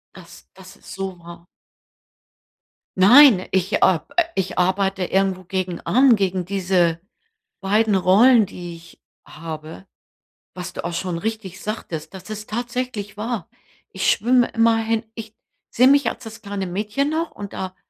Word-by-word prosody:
Das 175 -2 -15
das 185 -1 -15
ist - - -12
so 190 -2 -6
wahr. 170 0 -13 1.5
Nein, 220 0 +7
ich, 190 +2 0
äh - - +2 0.4
äh, 350 - +4
ich 190 -1 -3
arbeite 190 +1 +1
irgendwo 190 0 0
gegen 185 -1 -4
an, 255 0 +4
gegen 190 -3 -1
diese 180 -3 0 0.6
beiden 210 +1 +1
Rollen, 215 +5 +5
die 175 -2 -9
ich 165 0 -17 0.2
habe. 155 +3 -9 0.7
Was 180 0 -7
du - - -6
auch 170 0 -4
schon 170 -1 -3
richtig 200 -3 -5
sagtest, 170 -6 -6
das 190 +3 -10
ist 215 0 -7
tatsächlich 240 -2 -4
wahr. 215 -3 -4 0.4
Ich 190 - 0
schwimme 245 +3 +3
immer 230 0 +2
hin. 225 0 -1
Ich 220 -1 -9 0.3
sehe 255 +2 +4
mich 280 0 +4
als 250 - -9
das 225 0 -10
kleine 200 -2 -4
Mädchen 210 +10 -2
noch. 330 +2 -1
Und 200 -1 -9
da 185 0 -6
195 Hz, 150 wpm, -21 LUFS, 180-225 Hz, 1.5 s, Nein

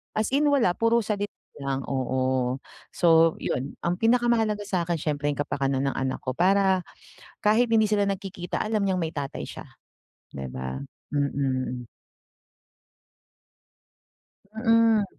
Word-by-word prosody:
As 215 0 +1
in, 295 +1 +3
wala, 235 -11 +3
puro 230 +1 +3
salit 205 -1 -2 0.3
lang, 135 -1 -2
oo, 130 -1 0 0.3
so, 165 -1 +4
'yon 130 +2 -3
ang 175 - +1
pinakamahalaga 225 -3 +2
sa'kin 175 -4 -1
siyempre 145 -1 -1
yung - - -5
kapakanan 135 -1 0
ng - - -1
anak 130 0 -1
ko, 130 - -3
para 190 +3 +3 0.6
kahit 225 +3 +3
hindi 220 -1 +4
sila 205 -1 +2
nagkikita, 190 -3 -3
alam 215 -1 0
niyang 185 -1 +1
may 160 -1 -3
tatay 140 -2 -4
siya, - - -8 0.7
'di 70 -1 -5
ba? 65 +1 -5 0.3
Mm. 130 -4 -1 2.7
Mm. 225 -2 +4
175 Hz, 125 wpm, -26 LUFS, 135-215 Hz, 2.7 s, so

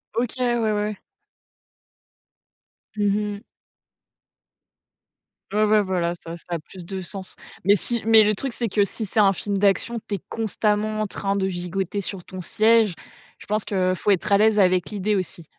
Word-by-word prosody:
OK, 240 +2 -1 0.2
ouais, 220 -1 +1
ouais. 210 0 -1 2.0
Mmh 205 -1 +2
mh. 210 0 -3 2.1
Ouais, 215 +1 +3
ouais 210 0 +4
voilà, 180 -3 -1
ça, 170 0 -8
ça 170 - -11
a 165 - -3
plus 180 +3 -12
de 190 +1 -5
sens. 190 +1 -8 0.3
Mais 200 - +6
si 235 +3 0
mais 225 -1 +8
le 210 - +3
truc 265 +3 -4
c'est 235 -2 -2
que 205 +1 +3
si 215 +3 -3
c'est 210 - -1
un 200 -2 +5
film 200 +2 -3
d'action 205 +4 +1
tu 205 - -1
es - - -5
constamment 215 -1 0
en - - +1
train 200 0 -2
de 195 -1 0
gigoter 185 +2 -3
sur 190 -2 -6
ton 185 0 -8
siège, 220 +2 +3 0.4
je - - -14
pense 210 0 -1
que 185 -2 +1
faut 205 - -2
être 195 +1 0
à 200 - +6
l'aise 215 0 +4
avec 185 -2 +3
l'idée 210 0 -1
aussi. 170 -3 -4
205 Hz, 175 wpm, -23 LUFS, 190-215 Hz, 2.1 s, mais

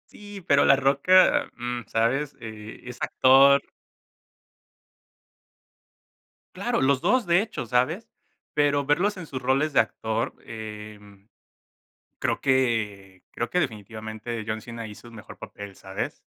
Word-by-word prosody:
Sí, 205 -1 -11
pero 140 0 +5
La - - +7
Roca, 140 +7 +4
mm, 120 0 -4
¿sabes? 135 +6 0
Eh, 110 -1 -9
es 125 -1 -8
actor. 135 +2 +5 2.9
Claro, - - -1
los 135 0 +3
2, 220 - +2
de 175 +2 +4
hecho, 220 - -5
¿sabes? 140 - 0 0.4
Pero 145 -1 +2
verlos 180 +9 +1
en 185 -3 -8
sus 130 -4 -6
roles 135 +4 +1
de - - +3
actor, 110 0 -1
em, 105 -2 -10 0.9
creo - - -1
que 105 -8 -1
creo 120 - -3
que 180 - 0
definitivamente 110 - -4
John 110 0 -3
Cena 115 0 -8
hizo 105 +2 -12
un 115 - -13
mejor 105 -1 -11
papel, 100 -2 -10
¿sabes? 95 0 -6
120 Hz, 130 wpm, -25 LUFS, 110-140 Hz, 2.9 s, La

